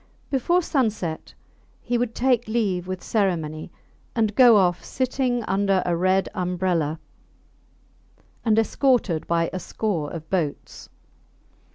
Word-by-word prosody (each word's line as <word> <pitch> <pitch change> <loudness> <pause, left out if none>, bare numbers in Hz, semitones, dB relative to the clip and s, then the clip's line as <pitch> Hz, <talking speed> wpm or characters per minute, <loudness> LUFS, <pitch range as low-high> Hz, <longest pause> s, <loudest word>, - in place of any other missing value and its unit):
Before 345 +7 +2
sunset 215 - -2 0.4
he 245 - -3
would 240 -1 -1
take 250 -3 +1
leave 200 -6 -1
with 185 -1 -5
ceremony, 170 -7 -1 0.4
and 220 -3 +1
go 240 -2 +7
off 180 -3 +2
sitting 255 -2 -1
under 195 -2 +1
a 175 - +1
red 185 +2 +2
umbrella, 180 -4 -1 1.4
and 220 -2 +2
escorted 225 - +1
by 165 0 +1
a 185 - -2
score 180 -6 -3
of 160 -2 -8
boats. 165 -7 -3
195 Hz, 120 wpm, -24 LUFS, 175-235 Hz, 1.4 s, go